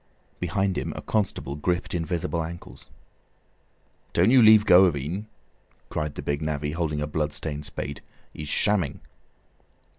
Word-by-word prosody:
Behind 95 +2 0
him - - -4
a - - -5
constable 95 -9 -1
gripped 85 +4 -1
invisible 85 0 -2
ankles. 85 +2 -9 1.3
"Don't 90 +7 +4
you 130 -1 +7
leave 110 -1 +7
go 90 -1 +8
of 85 -5 +2
en," 85 +10 -4 0.6
cried 75 -1 -3
the - - -6
big 70 +1 -2
navvy, 75 -1 -2
holding 75 -2 -2
a - - 0
blood 75 0 -2
stained 75 -2 -4
spade; 70 - -6 0.3
"he's 75 -1 -6
shamming." 95 -9 +1
85 Hz, 145 wpm, -25 LUFS, 75-95 Hz, 1.3 s, go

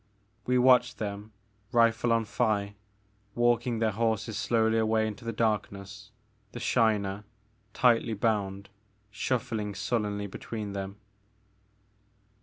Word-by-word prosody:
We 125 0 +3
watched 125 -1 +4
them, 105 0 -5 0.4
rifle 115 0 +3
on 115 -1 +2
thigh, 105 -3 0 0.6
walking 120 0 +2
their 110 -1 +1
horses 110 0 -1
slowly 115 0 +2
away 110 0 +2
into 110 +2 -6
the 115 - -3
darkness, 105 -2 -2 0.4
the 120 - -6
Shiner, 105 -5 +1 0.5
tightly 120 -4 +3
bound, 100 -2 -1 0.4
shuffling 105 -2 -2
sullenly 105 -2 -1
between 105 +1 -6
them. 100 0 -5
110 Hz, 105 wpm, -28 LUFS, 100-115 Hz, 0.6 s, watched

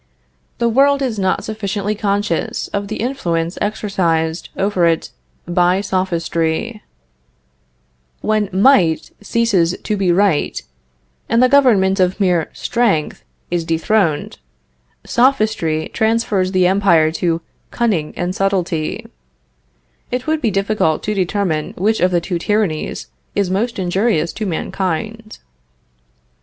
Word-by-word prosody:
The 235 - +1
world 275 +4 +3
is 230 -5 -2
not 190 -1 0
sufficiently 210 -1 -3
conscious 205 -4 -1
of 200 0 -3
the 215 - -4
influence 175 -10 -2
exercised 175 -6 -1
over 190 -3 +2
it 165 -1 0 0.4
by 180 +1 +2
Sophistry. 185 +2 -1 1.4
When 215 -2 0
might 190 - +3
ceases 200 -6 +1
to 215 - -1
be 195 -3 +1
right, 185 -4 +2 0.7
and 230 - +2
the - - +6
government 215 -9 +4
of 185 +2 +1
mere 180 -5 +1
strength 220 -11 -1 0.3
is 175 -1 0
dethroned, 165 +3 0 0.7
Sophistry 215 - +1
transfers 220 -4 +1
the 185 -1 +3
empire 180 -4 +3
to 170 -2 +1 0.3
cunning 200 -11 0
and 175 0 -2
subtilty. 185 -5 -1 1.0
It 250 +1 -3
would 315 0 0
be 235 - +2
difficult 195 -5 0
to 215 - -1
determine 185 -5 -1
which 215 +4 +1
of 180 - +3
the 175 -1 +1
two 175 0 -3
tyrannies 200 -5 -1 0.3
is 200 -3 0
most 230 +5 -1
injurious 185 -2 0
to 215 - -4
mankind. 200 +5 -3
195 Hz, 120 wpm, -18 LUFS, 170-215 Hz, 1.4 s, the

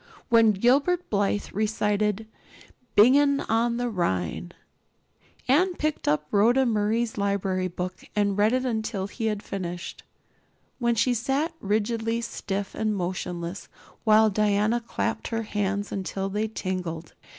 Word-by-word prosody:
When 230 -2 +5
Gilbert 280 - +2
Blythe 205 0 0
recited 210 0 0 0.7
"Bingen 280 +6 +5
on 235 +1 +1
the 245 0 -1
Rhine" 90 - -2 1.0
Anne 350 +8 +3
picked 305 -1 -2
up 150 +1 +2
Rhoda 240 +6 +4
Murray's 220 0 0
library 195 -2 0
book 180 +1 -5
and 205 -1 +1
read 210 +2 +3
it 255 +1 0
until 220 -5 -2
he 220 +3 -4
had 210 -1 -2
finished, 175 -3 -5 0.8
when 235 -1 +2
she 230 +3 +2
sat 275 +7 -1
rigidly 225 +3 0
stiff 200 -4 -4
and 215 -1 -1
motionless 175 0 -4 0.4
while 220 -1 +5
Diana 210 +3 +2
clapped 230 - -3
her 225 -1 -2
hands 205 -1 -2
until 195 0 -3
they 210 +2 -1
tingled. 180 -6 -4
210 Hz, 130 wpm, -26 LUFS, 195-235 Hz, 1.0 s, When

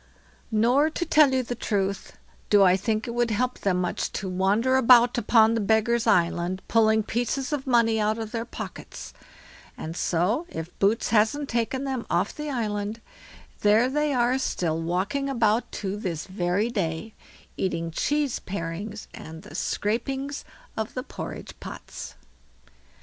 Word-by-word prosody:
Nor, 245 +7 +3
to 345 - -3
tell 305 -4 +5
you 260 -1 +1
the 245 - -4
truth, 195 -4 -2 0.3
do 205 -1 +6
I 185 -1 +6
think 215 +4 -1
it 235 - -4
would 240 0 +1
help 250 +4 -1
them 185 -2 +1
much 180 -1 -2
to 195 - -3
wander 200 +8 +2
about 245 -1 +6
upon 225 0 +4
the 230 - 0
Beggars' 220 +3 +2
island 175 +2 +1
pulling 220 -1 +3
pieces 245 +6 -2
of 280 -2 -3
money 230 -3 +3
out 215 +1 +1
of 220 -1 -5
their 230 -1 -2
pockets; 235 - -8 0.6
and 160 +1 -6
so, 185 - 0
if 165 - -7
Boots 205 +3 +2
hasn't 225 +7 +2
taken 240 +3 -1
them 265 -3 -3
off - - +1
the 300 0 -5
island, 215 -4 -2 0.6
there 215 +4 +4
they 300 +2 0
are 250 0 +2
still 165 -10 -1
walking 190 - -1
about 230 -3 +1
to 195 -1 -3
this 180 -7 -4
very 190 +4 -1
day, 195 0 -3 0.4
eating 165 -3 -2
cheese 290 - 0
parings 200 +3 -5
and 160 +1 -10
the - - -12
scrapings 265 - -2 0.3
of 220 -1 -4
the 255 - -3
porridge - - -7
pots. - - -8
220 Hz, 155 wpm, -26 LUFS, 195-250 Hz, 0.6 s, do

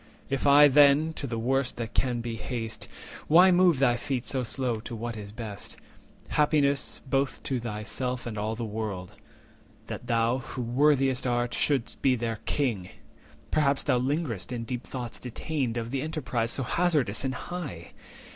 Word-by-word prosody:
If 135 +1 0
I, 145 +1 +8
then, 145 +3 +5
to 140 - -5
the 115 -2 -3
worst 130 +3 0
that 115 -1 -5
can 125 -2 0
be 115 -1 -4
haste, 115 0 -5 0.4
Why 180 +4 +7
move 175 -3 +5
thy 125 -2 +3
feet 130 0 -3
so 130 - -1
slow 120 -1 -2
to 115 +2 -7
what 115 +1 -4
is 105 -2 -8
best? 105 -2 -7 0.5
Happiest, 145 -2 +1
both 135 +1 0
to 130 -2 -1
thyself 120 +3 -3
and 115 -2 -5
all 110 +1 -2
the 115 0 -4
world, 105 -4 -5 0.7
That - - -7
thou, 115 +2 +2
who 130 -1 -6
worthiest 135 +1 +2
art, 120 0 0
shouldst 135 -5 0
be 130 -2 +4
their 115 -2 -3
King! 110 -11 0 0.6
Perhaps 140 -3 +2
thou 130 -3 +2
linger'st 130 - -2
in 120 -2 -3
deep 125 +1 -5
thoughts 125 -3 -6
detained 125 0 -3
Of 115 0 -3
the 135 -1 -1
enterprise 130 -7 -2
so 135 - 0
hazardous 150 - +1
and 130 -1 -1
high! 135 - -6
125 Hz, 165 wpm, -28 LUFS, 115-140 Hz, 0.7 s, I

